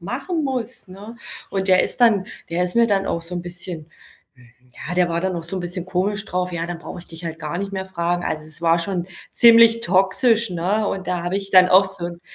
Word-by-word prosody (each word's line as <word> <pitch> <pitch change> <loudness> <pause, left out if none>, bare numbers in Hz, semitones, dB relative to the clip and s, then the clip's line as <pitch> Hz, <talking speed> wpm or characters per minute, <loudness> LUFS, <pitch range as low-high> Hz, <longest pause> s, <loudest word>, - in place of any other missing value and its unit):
machen 275 - -3
muss, 250 -5 -3
ne?“ 205 +5 -11 0.3
Und 195 0 -2
der 185 -1 +5
ist - - -4
dann 210 -5 +4 0.2
der 175 +2 0
ist 180 - -3
mir 235 0 +5
dann 195 -2 +1
auch 170 - -2
so 170 +2 -6
'n - - -3
bisschen 175 -2 -7 1.0
ja, 180 - -3
der 180 -1 +2
war 170 0 -1
dann 185 0 -2
auch 165 - -5
so 190 +3 -4
'n - - -3
bisschen 175 0 -5
komisch 200 +3 -1
drauf. 180 -3 -2
„Ja, 170 -1 -3
dann 175 -1 -5
brauche - - -8
ich 175 - -11
dich 165 +1 -11
halt 165 -1 -5
gar 160 +1 -5
nicht 200 +1 -4
mehr 190 -1 -4
fragen.“ 175 -1 -2
Also, 155 - -3
es 155 0 -8
war 165 0 +3
schon 180 0 -2 0.3
ziemlich 230 -1 +7
toxisch, 210 +4 +2
ne? 185 +5 -1
Und 190 -1 -4
da 180 -1 -2
habe 175 +2 -2
ich 195 0 -5
dann 185 -1 +7
auch 190 +2 +6
so 190 -3 -4
'n 170 0 -9
185 Hz, 245 wpm, -21 LUFS, 175-200 Hz, 1.0 s, ziemlich